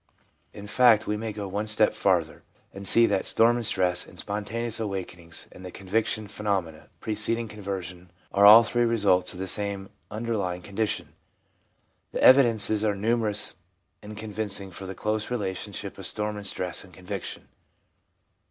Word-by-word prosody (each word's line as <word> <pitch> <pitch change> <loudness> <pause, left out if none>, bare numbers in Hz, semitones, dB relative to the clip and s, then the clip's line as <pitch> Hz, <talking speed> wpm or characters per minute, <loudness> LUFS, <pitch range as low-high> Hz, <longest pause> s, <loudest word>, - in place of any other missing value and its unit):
In 100 - -10
fact 115 0 +4
we 105 - -1
may 110 +1 -4
go 105 -1 -6
one 100 +3 -3
step 110 0 +3
farther 85 -5 0 0.3
and 100 0 -5
see 115 +4 +8
that 100 -3 0
storm 120 +1 +3
and 120 - -3
stress 90 -1 +2
and - - -16
spontaneous 110 +3 -3
awakenings 90 -5 -6
and 95 - -13
the 90 - -7
conviction 105 +3 -2
phenomena 100 -6 -3
preceding 110 +2 0
conversion 95 -4 -7 0.2
are 100 - +2
all 110 +3 +10
three 120 +1 0
results 100 -6 +2
of - - -10
the 95 - -3
same 100 0 0 0.2
underlying 105 -5 -3
condition. 100 +1 -2 1.0
The - - -2
evidences 115 -5 +5
are 105 -2 +1
numerous 105 0 0 0.4
and 105 0 -10
convincing 105 -2 -3
for 95 +2 -8
the 95 - -7
close 105 0 -2
kinship 100 -7 -5
of - - -4
storm 105 0 -3
and 105 -1 -6
stress 90 -3 -3
and 95 - -17
conviction. 90 +2 -7
105 Hz, 155 wpm, -26 LUFS, 95-110 Hz, 1.0 s, all